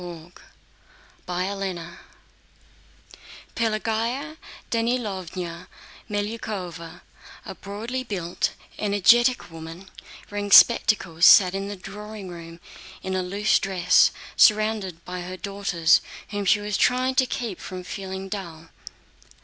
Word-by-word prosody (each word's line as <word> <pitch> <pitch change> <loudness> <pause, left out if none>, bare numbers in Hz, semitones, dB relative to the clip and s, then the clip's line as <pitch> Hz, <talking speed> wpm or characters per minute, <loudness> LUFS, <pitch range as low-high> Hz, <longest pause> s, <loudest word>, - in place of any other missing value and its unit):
CHAPTER 185 +1 -2
XI 165 -1 -8 1.7
Pelagéya 230 +7 -1 0.3
Danílovna 190 -7 -3 0.4
Melyukóva, 205 -6 -5 0.4
a - - -6
broadly 220 +6 -5
built, 180 -7 -2 0.3
energetic 235 +3 +3
woman 165 +3 -10 0.4
wearing 205 0 -3
spectacles, 190 -6 +6
sat 185 -2 +8
in 195 0 -3
the 205 - -5
drawing 205 +1 -9
room 170 -1 -10 0.4
in 190 - -3
a 185 - 0
loose 200 +4 +1
dress, 180 -2 +4 0.3
surrounded 210 -5 +3
by 180 0 -5
her 185 +1 -7
daughters 195 -5 +2 0.3
whom 205 -1 -3
she 205 +2 +4
was 205 -1 -2
trying 255 +1 +2
to 260 0 +2
keep 230 -9 -4
from 185 -1 -7
feeling 190 +1 -6
dull. 170 -5 -7
195 Hz, 105 wpm, -24 LUFS, 180-215 Hz, 1.7 s, sat